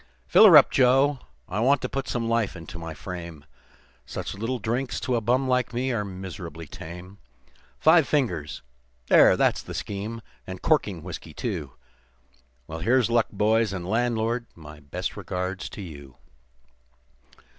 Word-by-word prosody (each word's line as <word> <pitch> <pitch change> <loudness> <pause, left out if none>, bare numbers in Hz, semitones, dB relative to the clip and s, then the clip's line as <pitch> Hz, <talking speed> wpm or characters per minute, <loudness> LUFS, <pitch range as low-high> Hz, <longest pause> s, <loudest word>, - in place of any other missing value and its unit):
"Fill 220 - +7
her 170 -6 +10
up, 145 - +6
Joe, 135 +2 +4 0.3
I 95 - -3
want 135 +4 +4
to - - 0
put 135 +1 -4
some 115 -2 -2
life 115 -4 0
into 80 0 -9
my 80 -1 -7
frame 85 -5 -8 0.6
Such - - -6
little 115 +6 -3
drinks 120 +4 -2
to 125 - 0
a 115 - 0
bum 125 +4 +1
like 125 -2 0
me 130 +2 0
are 115 -4 -1
miserably 90 -4 -8
tame; 90 +6 -10 0.6
Five 160 -2 +5
fingers 90 - -1 0.5
there, - - +7
that's - - +2
the - - -9
scheme 105 +3 -5 0.2
and 95 -1 -6
corking 105 - +1
whiskey, 85 -3 -8
too. 85 - -4 0.9
Well, 80 +3 -7
here's 120 +6 +2
luck, 115 -1 +3
boys, 110 0 +2
and 90 -2 -5
landlord, 115 +1 0
my 75 -2 -12
best 70 -2 -5
regards 90 +1 -4
to 100 - -8
you. 70 -7 -11
105 Hz, 155 wpm, -25 LUFS, 85-125 Hz, 0.9 s, her